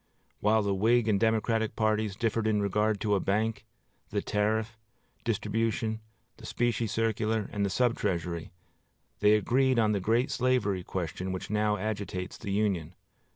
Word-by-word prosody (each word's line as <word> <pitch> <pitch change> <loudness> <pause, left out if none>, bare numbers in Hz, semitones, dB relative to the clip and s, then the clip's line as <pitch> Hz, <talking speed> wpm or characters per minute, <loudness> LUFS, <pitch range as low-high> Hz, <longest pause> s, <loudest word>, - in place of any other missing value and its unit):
While 110 +1 +3
the 100 -1 0
Whig 115 +4 +3
and 105 -3 +3
Democratic 110 0 +1
parties 110 -2 +1
differed 115 0 0
in 105 -1 +2
regard 105 +1 +1
to 105 -1 +1
a 100 - +3
bank, 110 +3 -1 0.4
the - - -2
tariff, 110 +2 0 0.5
distribution, 110 0 -1 0.4
the - - -12
specie 120 -1 0
circular, 110 0 0
and 100 - 0
the 100 - +1
sub 120 +4 +2
treasury, 85 -4 -2 0.7
they 105 0 +5
agreed 130 +4 +2
on 110 -2 +3
the 100 - +1
great 115 +7 +1
slavery 115 -7 +1
question 95 +1 -4
which 95 +2 -5
now 105 0 +1
agitates 100 -4 -4
the - - -6
Union. 95 -5 0
105 Hz, 155 wpm, -29 LUFS, 100-115 Hz, 0.7 s, they